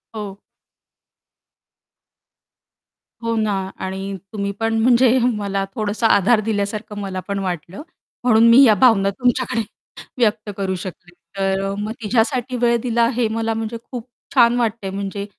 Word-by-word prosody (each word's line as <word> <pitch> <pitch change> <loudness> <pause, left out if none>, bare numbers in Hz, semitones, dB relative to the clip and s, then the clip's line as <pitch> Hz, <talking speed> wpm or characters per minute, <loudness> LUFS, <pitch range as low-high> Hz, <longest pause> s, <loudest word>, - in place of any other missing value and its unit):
हो. 205 -2 -6 2.8
हो 230 0 -1
ना. 215 -2 0 0.2
आणि 195 +1 -5 0.2
तुम्ही 200 -1 -2
पण 225 0 0
म्हणजे 250 +1 +4 0.2
मला 200 -1 -2
थोडंसं 215 +1 0
आधार 215 +2 +4
दिल्यासारखं 210 0 -3
मला 190 -2 -4
पण 200 0 -2
वाटलं 180 - -5 0.4
म्हणून 230 -1 +5
मी 245 +4 +8
या 220 -4 +7
भावना 200 -5 +5
तुमच्याकडे 245 +2 0 0.6
व्यक्त 215 -2 +1
करू 190 -1 -1
शकले. 175 0 -8 0.3
तर 195 0 0
अ, - - -3
मग 210 +1 -3
तिच्यासाठी 250 +3 0
वेळ 235 0 +3
दिला 235 -1 +2
हे 240 -3 +1
मला 225 0 -1
म्हणजे 225 +1 -4
खूप 245 -1 -6 0.3
छान 240 -1 +5
वाटतंय 220 -4 -1
म्हणजे 200 +1 -4
215 Hz, 135 wpm, -20 LUFS, 200-235 Hz, 2.8 s, मी